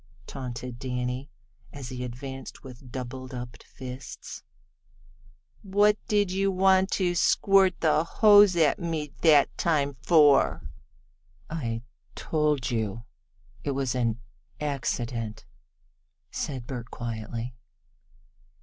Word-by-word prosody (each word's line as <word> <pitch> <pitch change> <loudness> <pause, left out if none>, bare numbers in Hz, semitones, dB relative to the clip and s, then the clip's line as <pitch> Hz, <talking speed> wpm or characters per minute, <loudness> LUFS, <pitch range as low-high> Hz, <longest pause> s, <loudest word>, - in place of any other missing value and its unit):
taunted 125 -2 -6
Danny, 125 +1 -3 0.4
as 135 -3 -8
he 125 -1 -5
advanced 130 +2 -7
with 125 -1 -12
doubledup 125 -1 -7
fists. 130 0 -9 1.2
"What 205 +1 +3
did 205 -3 +2
you 195 +1 +1
want 190 0 +4
to 180 -2 +1
squirt 190 +2 +3
the 155 -1 +3
hose 205 0 +6
on 155 -3 +5
me 160 -4 -3
that 150 -4 +5
time 145 -4 +1
for?" 145 -2 +4 0.8
"I 115 -8 -3 0.3
told 150 -6 0
you 115 -1 -2 0.6
it 140 - -2
was 135 -3 0
an 120 -3 0 0.4
accident," 120 -6 -3 0.9
said 130 -5 -4
Bert 125 -2 -6
quietly. 115 +1 -5
135 Hz, 100 wpm, -27 LUFS, 125-165 Hz, 1.2 s, hose